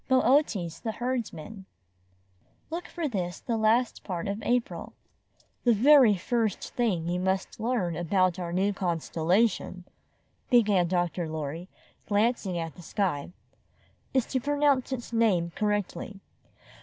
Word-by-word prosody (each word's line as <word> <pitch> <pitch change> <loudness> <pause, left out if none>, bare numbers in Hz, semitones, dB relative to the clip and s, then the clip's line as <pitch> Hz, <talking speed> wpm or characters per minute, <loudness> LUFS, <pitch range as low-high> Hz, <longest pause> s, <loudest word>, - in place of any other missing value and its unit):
BOOTES, 255 - +2
THE 225 -2 -3
HERDSMAN 220 -6 -4 1.1
Look 340 +2 -4
for 335 -3 -3
this 180 -8 -3
the 235 - -2
last 225 +2 +2
part 180 -3 -4
of 200 +2 -3
April 245 +2 -1 0.7
"The 240 -2 +4
very 255 -2 +6
first 220 +2 -2
thing 195 -9 0
you 175 +1 -1
must 190 +3 -1
learn 220 -7 -1
about 185 +2 +1
our 175 -1 -4
new 195 +3 +1
constellation," 180 +2 0 0.7
began 210 -8 +4
Dr. 175 -1 -1
Lorry, 160 +3 -5 0.4
glancing 205 -3 +1
at 165 -1 -4
the 180 - -13
sky, 175 -5 -2 0.8
''is 260 -3 +2
to 260 - +1
pronounce 285 -1 +1
its 245 -2 -5
name 195 -7 +2
correctly. 205 -1 -2
205 Hz, 125 wpm, -28 LUFS, 175-240 Hz, 1.1 s, very